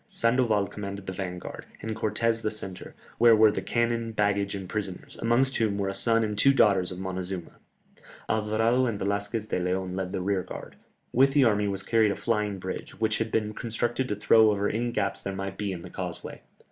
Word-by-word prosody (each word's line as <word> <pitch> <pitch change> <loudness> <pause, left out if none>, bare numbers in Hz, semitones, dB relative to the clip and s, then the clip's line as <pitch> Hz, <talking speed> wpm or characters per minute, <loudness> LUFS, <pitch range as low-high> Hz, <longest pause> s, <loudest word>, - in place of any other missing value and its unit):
Sandoval 115 -4 +2
commanded 100 -1 -6
the 95 - -4
vanguard, 90 -1 -6
and 110 0 -4
Cortès 115 +1 0
the 110 - 0
centre, 95 -4 -8 0.2
where 120 -1 +7
were 110 0 +6
the - - -3
cannon, 115 -1 0
baggage, 100 -1 +1
and 95 -2 -6
prisoners, 95 -1 -5
amongst 125 +4 +2
whom 105 -3 +1
were 100 -1 -1
a - - -3
son 115 +3 +2
and 105 -1 -2
two 135 +6 +4
daughters 95 -7 +4
of 90 - -6
Montezuma; 95 -1 -4 0.8
Alvarado 110 +4 +2
and 110 -4 -2
Velasquez 100 +2 -2
de - - 0
Léon 90 +1 -1
led 95 -1 -3
the - - -2
rearguard. 95 0 -3 0.4
With 135 +2 +4
the 145 -1 +5
army 105 -3 +3
was 100 -1 -3
carried 110 -2 +3
a 100 - -1
flying 105 -3 -1
bridge, 95 0 -6
which 110 -1 +1
had 110 -1 -2
been 105 -1 0
constructed 120 +3 -2
to 105 - 0
throw 110 +2 +5
over 100 -1 +1
any 120 +3 -1
gaps 100 -3 -1
there 100 0 -4
might 95 0 -5
be 105 -2 -1
in 85 -2 -6
the - - -9
causeway. - - -6
105 Hz, 200 wpm, -27 LUFS, 95-115 Hz, 0.8 s, where